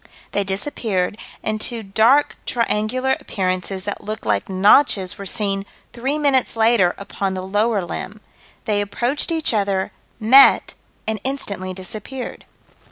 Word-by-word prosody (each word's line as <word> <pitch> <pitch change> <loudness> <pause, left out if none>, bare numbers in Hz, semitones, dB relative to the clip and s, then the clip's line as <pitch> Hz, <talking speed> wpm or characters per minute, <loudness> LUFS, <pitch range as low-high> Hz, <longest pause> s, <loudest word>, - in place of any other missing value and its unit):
They 205 - 0
disappeared, 195 -1 -1 0.2
and 215 0 -2
two 230 -1 -3
dark 225 +9 +3
triangular 240 +3 0
appearances 185 0 -3
that 205 - -5
looked 215 - -5
like 105 - 0
notches 195 0 +3
were 200 - -6
seen 195 -2 -1 0.3
three 265 +5 -1
minutes 275 -5 +2
later 220 -5 +3
upon 195 -1 -3
the 185 - -4
lower 205 +1 +1
limb. 200 +5 -6 0.5
They 205 -1 +1
approached 240 - -1
each 320 -6 0
other, 195 -3 0 0.3
met 255 +5 +6 0.3
and 220 -1 -1
instantly 200 -9 -3
disappeared. 215 +7 -7
210 Hz, 130 wpm, -21 LUFS, 195-240 Hz, 0.5 s, met